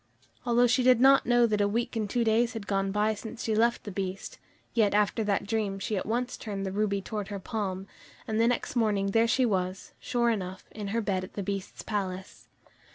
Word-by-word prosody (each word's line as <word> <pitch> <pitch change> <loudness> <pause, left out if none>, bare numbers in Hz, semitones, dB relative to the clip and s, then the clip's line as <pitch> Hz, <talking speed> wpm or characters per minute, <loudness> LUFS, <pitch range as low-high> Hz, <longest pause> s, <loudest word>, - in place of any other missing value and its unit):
Although 240 +1 +4
she 250 +2 +3
did 250 -1 +5
not 270 0 +6
know 240 0 +5
that 210 -2 +1
a 200 - +3
week 230 +4 -2
and 215 -2 -1
two 240 +3 +1
days 230 +1 +2
had 225 -3 -6
gone 195 -1 0
by 210 +2 +1
since 220 +3 -7
she 220 - 0
left 235 +2 +2
the 205 - -6
Beast, 190 0 -5 0.3
yet 210 -3 +3
after 210 +2 +2
that 205 -2 0
dream 205 -2 -1
she 195 +2 -3
at 190 - -3
once 245 +3 -1
turned 200 -3 -5
the 190 - -3
ruby 200 -1 0
towards 210 -1 -4
her 200 - -4
palm, 195 -1 -4 0.4
and 220 0 +1
the 230 - +4
next 245 +1 -1
morning 205 -4 +1
there 225 +2 +3
she 255 +2 +3
was, 185 -3 -2
sure 235 -1 +1
enough, 190 -3 -4
in 210 -2 -6
her 225 +4 -1
bed 195 -3 -1
in - - -13
the 200 - -4
Beast's 195 0 -5
palace. 190 -3 -4
210 Hz, 225 wpm, -28 LUFS, 195-230 Hz, 0.4 s, not